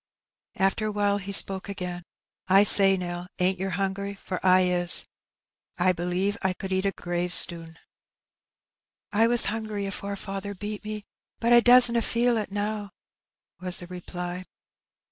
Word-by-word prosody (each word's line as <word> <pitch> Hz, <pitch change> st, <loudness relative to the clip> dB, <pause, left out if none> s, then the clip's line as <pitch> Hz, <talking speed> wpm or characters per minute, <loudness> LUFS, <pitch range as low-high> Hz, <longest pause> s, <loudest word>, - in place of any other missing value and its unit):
Afler 195 Hz, +3 st, 0 dB
awhile 205 Hz, -1 st, 0 dB
he 200 Hz, 0 st, -7 dB
spoke 195 Hz, -1 st, +2 dB
i^ain. 180 Hz, -3 st, -6 dB, 0.5 s
"I 195 Hz, +2 st, +5 dB
say, 195 Hz, -2 st, +6 dB
Nell, 175 Hz, 0 st, -6 dB
ain't 185 Hz, +1 st, 0 dB
yer 190 Hz, +1 st, -3 dB
hungry? 195 Hz, +2 st, -3 dB
for 190 Hz, -2 st, -7 dB
I 185 Hz, 0 st, +5 dB
is. 180 Hz, -1 st, +1 dB, 0.7 s
I 185 Hz, +1 st, +3 dB
believe 180 Hz, +4 st, -2 dB
I 190 Hz, -1 st, 0 dB
could 190 Hz, +1 st, -8 dB
eat 190 Hz, +1 st, 0 dB
a -, -, 0 dB
gravestnn." 175 Hz, -2 st, 0 dB, 1.3 s
"I 220 Hz, +2 st, +3 dB
was 240 Hz, 0 st, +4 dB
hungry 215 Hz, -2 st, -4 dB
afore 200 Hz, 0 st, -5 dB
faather 195 Hz, +1 st, -7 dB
beat 210 Hz, +1 st, -6 dB
me, 210 Hz, -1 st, -7 dB, 0.3 s
but 235 Hz, +1 st, +2 dB
I 240 Hz, -, +8 dB
doesna 240 Hz, 0 st, +7 dB
feel 240 Hz, +2 st, +1 dB
ib 215 Hz, -, -3 dB
now," 205 Hz, 0 st, -4 dB, 0.7 s
was 180 Hz, 0 st, 0 dB
tiie 175 Hz, 0 st, -12 dB
reply. 180 Hz, 0 st, -7 dB
195 Hz, 145 wpm, -25 LUFS, 180-205 Hz, 1.3 s, I